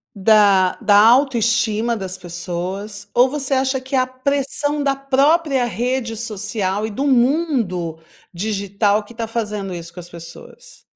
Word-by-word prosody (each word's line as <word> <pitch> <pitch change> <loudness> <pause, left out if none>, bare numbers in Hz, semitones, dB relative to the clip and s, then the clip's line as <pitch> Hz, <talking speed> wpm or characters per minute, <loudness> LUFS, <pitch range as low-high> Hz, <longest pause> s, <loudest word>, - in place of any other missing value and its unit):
da 200 -2 +4
da 205 - +3
autoestima 235 -1 +3
das 185 -2 -5
pessoas, 185 +4 -6
ou 245 +2 +6
você 275 0 -2
acha 265 0 0
que 265 +1 -4
é - - +4
a 255 - +2
pressão 280 +2 -1
da 275 -1 +1
própria 275 0 +2
rede 240 -1 -2
social 205 -2 -3
e 220 - -5
do 275 +8 -2
mundo 245 - +1 0.3
digital 200 +2 -1
que 220 - -15
tá 230 - -3
fazendo 210 -4 -4
isso 170 -1 -8
com 175 - -11
as 175 0 -10
pessoas? 170 - -13
225 Hz, 150 wpm, -19 LUFS, 200-265 Hz, 0.3 s, ou